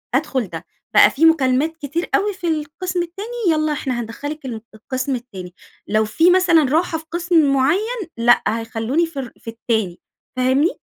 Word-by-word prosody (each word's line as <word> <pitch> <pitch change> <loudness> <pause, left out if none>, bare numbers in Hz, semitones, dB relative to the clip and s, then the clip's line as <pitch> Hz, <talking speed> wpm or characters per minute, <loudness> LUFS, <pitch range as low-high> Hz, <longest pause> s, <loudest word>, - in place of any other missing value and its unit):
أدخل 260 -6 0
ده، - - -8 0.3
بقى - - +7
في 315 +4 +2
مكالمات 310 0 +3
كتير 320 +3 -4
أوي 410 +1 +1
في 370 -2 -5
القسم 330 +4 -2
التاني، 375 +5 -8 0.2
يلّا 310 -1 +1
إحنا 260 -4 -3
هندخلك 290 +6 -7
الم 230 -4 -5
القسم 255 +4 -3
التاني، 190 -7 -9 0.3
لو 215 +1 +2
في 325 +12 +3
مثلًا 360 -4 +4
راحة 325 0 +1
في 320 - -11
قسم 335 -4 +2
معيّن 390 - 0
لأ، 240 +1 +4
هيخلوني 225 +7 -1
في 325 -4 -7
ال 250 -3 -6
في - - -9
التاني، 220 -5 -2 0.4
فاهمني؟ 260 +6 +2
290 Hz, 165 wpm, -20 LUFS, 240-335 Hz, 0.4 s, بقى